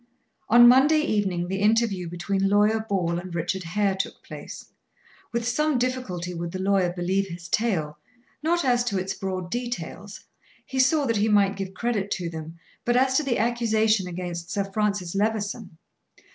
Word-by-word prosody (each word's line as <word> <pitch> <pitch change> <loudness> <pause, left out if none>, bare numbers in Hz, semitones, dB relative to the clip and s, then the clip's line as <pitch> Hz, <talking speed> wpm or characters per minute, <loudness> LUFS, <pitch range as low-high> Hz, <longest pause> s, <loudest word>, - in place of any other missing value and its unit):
On 240 +2 +8
Monday 280 +5 +6
evening 195 - 0
the 190 +1 -2
interview 210 -5 +2
between 195 +3 -1
Lawyer 210 +2 +3
Ball 185 -6 -1
and 175 -1 -8
Richard 175 +3 -2
Hare 195 +3 0
took 190 - -5
place. - - -9 0.7
With 235 0 -2
some 300 +3 +1
difficulty 240 -9 -2
would 170 0 -4
the - - -3
lawyer 190 -2 +2
believe 185 +2 -1
his 170 -1 -8
tale 160 -10 -1 0.4
not 340 +1 +1
as 245 -1 +3
to 205 -5 -1
its 190 +1 -2
broad 185 -2 -4
details; 215 -4 -5 0.4
he 265 - -4
saw 280 +3 +3
that 230 -4 +1
he 210 +2 +2
might 200 -1 +3
give 190 -1 -6
credit 215 -4 -1
to 175 -2 -4
them 160 +1 -8 0.3
but 240 +1 +2
as 260 +1 +3
to 305 - +2
the 265 -4 0
accusation 220 -3 +1
against 175 -1 -5
Sir 200 - -1
Francis 200 -3 -1
Levison. 210 -2 -2
200 Hz, 170 wpm, -25 LUFS, 180-235 Hz, 0.7 s, On